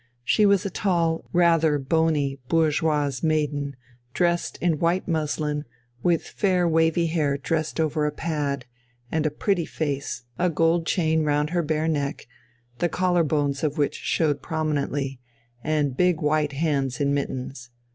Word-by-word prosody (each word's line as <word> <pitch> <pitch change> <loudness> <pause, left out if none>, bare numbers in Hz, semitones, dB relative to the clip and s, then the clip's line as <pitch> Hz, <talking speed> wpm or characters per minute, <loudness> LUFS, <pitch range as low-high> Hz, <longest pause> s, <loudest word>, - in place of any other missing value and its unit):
She 210 - +4
was 200 0 +3
a 200 - -2
tall, 170 -4 0
rather 165 -4 +4
bony 145 -1 +1
bourgeoise 150 -4 +1
maiden, 150 -3 0 0.4
dressed 175 -1 0
in 165 -4 0
white 175 +2 +1
muslin, 150 -2 -1 0.4
with 170 -2 +2
fair 185 -3 +1
wavy 165 +1 +2
hair 155 -4 0
dressed 160 +3 -2
over 155 -1 +1
a - - -1
pad, 145 -4 -2 0.5
and 155 -1 +1
a - - +1
pretty 170 +3 -1
face, 140 -4 -3 0.2
a 180 0 +3
gold 165 +1 +1
chain 160 -3 +2
round 150 +1 +1
her 175 -1 +1
bare 155 0 -1
neck, 145 -3 -2 0.5
the 175 - +1
collar 180 -1 +2
bones 145 -2 0
of 150 -1 0
which 145 -1 +1
showed 150 -4 0
prominently, 145 -4 -2 0.4
and 150 -4 0
big 180 -3 +3
white 150 -1 +1
hands 140 -4 -1
in 140 -1 +1
mittens. 130 -2 -4
155 Hz, 145 wpm, -24 LUFS, 145-165 Hz, 0.5 s, She